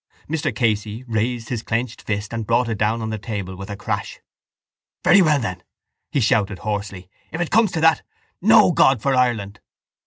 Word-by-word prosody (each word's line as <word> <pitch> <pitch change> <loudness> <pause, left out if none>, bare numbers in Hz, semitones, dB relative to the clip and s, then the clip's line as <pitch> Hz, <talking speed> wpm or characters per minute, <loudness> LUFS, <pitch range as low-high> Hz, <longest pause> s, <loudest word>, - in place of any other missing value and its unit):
Mr 155 0 -2
Casey 110 0 -1
raised 115 0 -2
his 120 -3 -3
clenched 115 +1 -3
fist 105 +1 -4
and 115 -2 -4
brought 120 +1 +2
it 110 -3 -3
down 110 +2 0
on 110 - -3
the 110 - -4
table 100 -4 -5
with 95 +1 -9
a 100 - -5
crash. 100 - -4 0.8
—Very 195 - +6
well 155 -4 +3
then, 90 -7 -4 0.5
he 145 - +1
shouted 105 -4 +1
hoarsely, 100 -3 -4 0.2
if 160 - -5
it 175 - -2
comes 220 -2 +4
to 160 - -1
that, 160 -2 +4 0.4
no - - +6
God 135 -3 +4
for 135 +5 0
Ireland! 110 -6 0
115 Hz, 185 wpm, -21 LUFS, 105-125 Hz, 0.8 s, Very